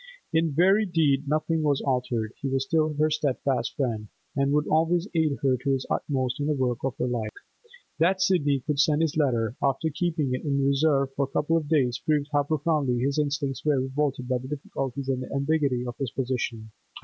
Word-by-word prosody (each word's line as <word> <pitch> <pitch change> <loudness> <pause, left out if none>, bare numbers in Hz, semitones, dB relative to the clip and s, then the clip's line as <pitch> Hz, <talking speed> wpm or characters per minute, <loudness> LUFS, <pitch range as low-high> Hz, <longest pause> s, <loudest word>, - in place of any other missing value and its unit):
In 160 0 +2
very 195 +7 +4
deed 150 -5 +2
nothing 155 +2 0
was 145 -3 +2
altered; 125 -4 -1
he 140 - -1
was 135 0 0
still 155 +2 +1
her 155 +1 +2
steadfast 135 -5 -1
friend, 115 -6 -2 0.3
and 140 0 +1
would 150 +1 +2
always 165 +3 +2
aid 160 -4 +1
her 130 -2 +3
to 135 +2 0
his 130 -1 -2
utmost 130 -1 -1
in 145 - -1
the 150 - +1
work 125 -3 0
of 135 -1 -2
her - - 0
life. 120 -3 -2 0.7
That 185 +4 +3
Sidney 145 -8 +2
could 145 -2 -1
send 155 +1 +3
this 160 -3 0
letter, 120 -6 +1
after 140 +3 +1
keeping 155 -4 -1
it 130 - -3
in 140 -2 0
reserve 140 -1 +2
for 140 0 0
a 135 - -16
couple 150 +3 +1
of 160 -3 0
days, 130 -7 +2
proved 150 -2 +1
how 145 - +4
profoundly 150 -4 0
his 140 +4 0
instincts 140 -3 -1
were 150 -3 +2
revolted 130 -1 -1
by 125 -1 0
the 130 - -8
difficulties 135 -2 -4
and 130 -1 0
the 130 - -7
ambiguity 140 -3 +1
of 120 -1 -5
his 135 -3 -1
position. 120 -4 -3
140 Hz, 205 wpm, -26 LUFS, 130-155 Hz, 0.7 s, very